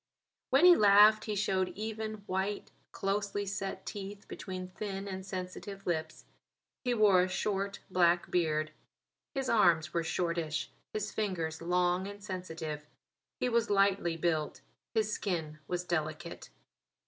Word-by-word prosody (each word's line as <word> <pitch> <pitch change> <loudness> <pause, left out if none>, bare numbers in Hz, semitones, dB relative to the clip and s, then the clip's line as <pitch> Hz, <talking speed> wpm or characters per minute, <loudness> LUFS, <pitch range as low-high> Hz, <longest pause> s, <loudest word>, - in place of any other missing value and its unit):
When 275 +6 +5
he 360 -1 +10
laughed 210 0 +7
he 215 - -2
showed 190 -2 +1
even, 215 0 -4
white, 190 +2 -2 0.2
closely 200 +1 -1
set 195 -1 -4
teeth 200 0 -7
between 185 -1 -6
thin 195 +1 -5
and 190 -1 -5
sensitive 195 +1 -6
lips. 160 -2 -2 0.6
He 250 -2 +1
wore 205 -5 +6
a 180 - +2
short, 195 +1 -2
black 175 -1 +3
beard. 155 -3 +1 0.6
His 270 -1 -1
arms 170 -9 +4
were 170 - +1
shortish; 165 -2 -1 0.2
his 215 -1 -3
fingers 170 -7 -2
long 180 +2 +1
and 205 0 -9
sensitive. 160 -6 -5 0.5
He - - +1
was 235 -1 +2
lightly 195 -4 +3
built; 160 -2 -1 0.3
his 215 -1 +1
skin 160 -6 -2
was 180 0 -2
delicate. 170 -1 -3
190 Hz, 135 wpm, -32 LUFS, 170-205 Hz, 0.6 s, he